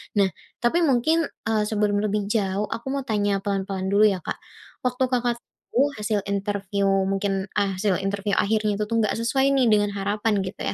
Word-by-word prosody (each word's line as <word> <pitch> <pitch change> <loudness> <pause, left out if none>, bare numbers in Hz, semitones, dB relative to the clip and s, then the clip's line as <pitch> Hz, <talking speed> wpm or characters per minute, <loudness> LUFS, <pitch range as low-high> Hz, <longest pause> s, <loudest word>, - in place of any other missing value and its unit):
Nah, 195 -2 +3 0.3
tapi 285 +9 +3
mungkin, 315 +6 +2 0.2
eee, 215 -1 +2
sebelum 210 -1 +1
lebih 210 0 -1
jauh, 200 -2 0
aku 230 +3 -5
mau 275 - -2
tanya 205 -4 0
pelan-pelan 195 -1 -2
dulu, 210 +1 +6
ya, 190 -4 -1
Kak. - - -4 0.5
Waktu 250 +1 0
Kakak 245 -1 +1 0.4
tahu 280 +4 +4
hasil 210 -1 -1
interview 200 0 -1 0.2
mungkin 195 0 -1
a 200 -2 0
hasil 190 -1 +1
interview 200 +1 -2
akhirnya 215 0 +1
itu, - - +1
tuh, 230 - -2
gak 210 - +1
sesuai, 265 +4 +1
nih, 255 -3 +3
dengan 205 -1 +3
harapan 205 +1 0
gitu, 185 - -7
205 Hz, 180 wpm, -24 LUFS, 195-225 Hz, 0.5 s, dulu